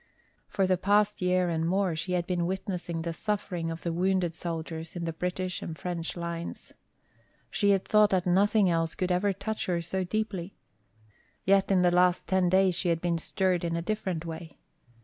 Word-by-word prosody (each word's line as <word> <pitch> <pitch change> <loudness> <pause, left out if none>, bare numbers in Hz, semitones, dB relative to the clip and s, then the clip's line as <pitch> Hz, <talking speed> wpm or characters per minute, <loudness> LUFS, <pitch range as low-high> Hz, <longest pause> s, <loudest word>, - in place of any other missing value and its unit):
For 195 - +1
the 185 -1 +2
past 205 +2 +2
year 180 0 +2
and 165 -1 0
more 185 0 +1
she 180 +4 -3
had 175 -1 0
been 175 -2 0
witnessing 180 -3 -3
the 170 0 -3
suffering 190 -3 -2
of 165 0 -6
the 170 - -1
wounded 180 -1 +1
soldiers 165 -1 -5
in 170 -1 -3
the 165 - -2
British 180 +2 -3
and 160 - -6
French 170 -2 -4
lines. 170 0 -5 0.8
She 205 - +2
had 195 -2 +3
thought 210 -1 +5
that 185 -3 +1
nothing 200 +3 +4
else 165 -1 0
could 185 0 -1
ever 190 +3 +2
touch 220 +3 -4
her 175 -2 +1
so 180 +3 -2
deeply. 200 -2 -3 0.9
Yet 195 0 +4
in 190 -2 +4
the 175 - +4
last 180 0 +3
ten 190 -2 +2
days 190 0 +4
she 175 +1 0
had 165 -1 +1
been 170 -1 0
stirred 185 0 0
in 170 -1 -1
a 170 - -1
different 185 -4 -2
way. 160 -1 -7
180 Hz, 190 wpm, -28 LUFS, 170-190 Hz, 0.9 s, thought